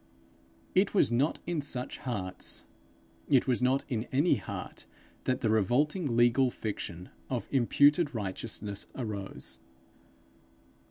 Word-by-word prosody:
It 190 +3 +3
was 190 - +4
not 130 +6 +2
in 170 -3 -1
such 130 -3 -3
hearts, 95 -8 -5 0.6
it 135 -4 +5
was 125 -1 +1
not 130 +2 +2
in 120 -4 -2
any 145 +2 +3
heart 100 - -7 0.4
that 130 - 0
the 110 - +2
revolting 130 - +2
legal 120 +2 +5
fiction 90 -6 -5 0.2
of 125 -3 -2
imputed 145 +3 +4
righteousness 100 0 -4
arose. 105 -6 -3
125 Hz, 115 wpm, -30 LUFS, 110-140 Hz, 0.6 s, it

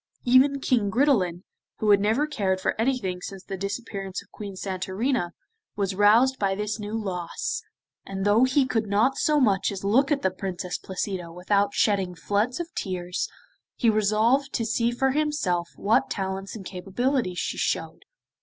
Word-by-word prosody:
Even 260 +3 +5
King 235 -6 +1
Gridelin, 200 - +2 0.3
who 215 -1 +2
had 200 - +6
never 220 +8 +2
cared 195 -11 -1
for - - 0
anything 225 -8 -1
since 195 +1 -7
the 195 - -5
disappearance 195 -1 -4
of - - -31
Queen 200 -2 -7
Santorina, 190 +3 -1 0.5
was 200 -1 -1
roused 225 +7 +4
by 195 -1 +1
this 210 +2 -3
new 210 +2 -3
loss, 180 -5 -3 0.4
and 195 0 -4
though 210 +4 +5
he 260 +1 +3
could 225 -4 -1
not 215 +7 +2
so 300 -1 +3
much 200 -7 +2
as 195 -1 -6
look 255 +9 +3
at 285 - +1
the 190 - +2
Princess 185 -1 -4
Placida 185 -2 -4
without 200 +3 0
shedding 195 -4 +1
floods 205 - 0
of 340 -1 -5
tears, 180 -2 -3 0.5
he 230 -3 +3
resolved 220 +6 +2
to 230 - 0
see 230 +1 +1
for 265 +2 +1
himself 265 - 0
what 210 +3 +2
talents 195 0 -3
and 200 -4 -8
capabilities 195 +2 -1
she - - -2
showed. - - -2
205 Hz, 165 wpm, -26 LUFS, 190-245 Hz, 0.5 s, had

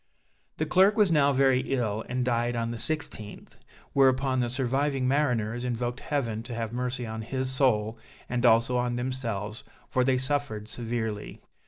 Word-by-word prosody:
The 155 - 0
clerk 190 +6 +4
was 205 -5 +4
now 145 -3 +4
very 135 -1 +4
ill, 115 -5 -1
and 125 0 -1
died 120 0 0
on 115 0 -1
the 120 - -4
16th, 115 -5 -4 0.4
whereupon 130 -1 +3
the 120 -1 0
surviving 135 +1 0
mariners 120 -5 +1
invoked 120 +1 -2
Heaven 120 -9 -2
to 120 0 -7
have 115 -1 -3
mercy 125 0 -2
on 110 0 -5
his 130 +3 -3
soul, 115 -4 +1 0.3
and 120 -1 -2
also 120 +1 +4
on 125 0 0
themselves, 115 -4 -3 0.3
for 130 - +2
they 130 0 +3
suffered 130 -5 -2
severely. 110 -2 -4
125 Hz, 160 wpm, -28 LUFS, 115-135 Hz, 0.4 s, clerk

